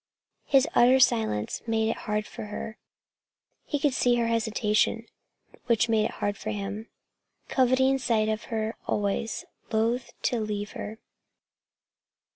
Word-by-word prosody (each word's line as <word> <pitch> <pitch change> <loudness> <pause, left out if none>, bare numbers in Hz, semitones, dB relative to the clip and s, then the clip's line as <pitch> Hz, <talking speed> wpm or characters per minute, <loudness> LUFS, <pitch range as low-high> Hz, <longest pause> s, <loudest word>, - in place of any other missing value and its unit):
His 270 +1 +4
utter 255 +2 +6
silence 110 - +2
made 220 0 +1
it - - -2
hard 210 0 0
for - - -8
her. 215 +1 -6 0.9
He 290 - -1
could 285 -1 +1
see 245 -1 +3
her 235 -1 +1
hesitation, 225 0 +1 0.6
which 235 0 +3
made 220 -1 +3
it - - -2
hard 205 0 -1
for 215 - -5
him, 210 +1 -4 0.6
coveting 260 +1 +3
sight 225 -4 +1
of 215 0 -2
her 220 0 -2
always, 205 +2 -1 0.3
loath 230 +3 +1
to 240 - +1
leave 210 -1 -3
her. 215 +2 -6
220 Hz, 135 wpm, -27 LUFS, 210-240 Hz, 0.9 s, utter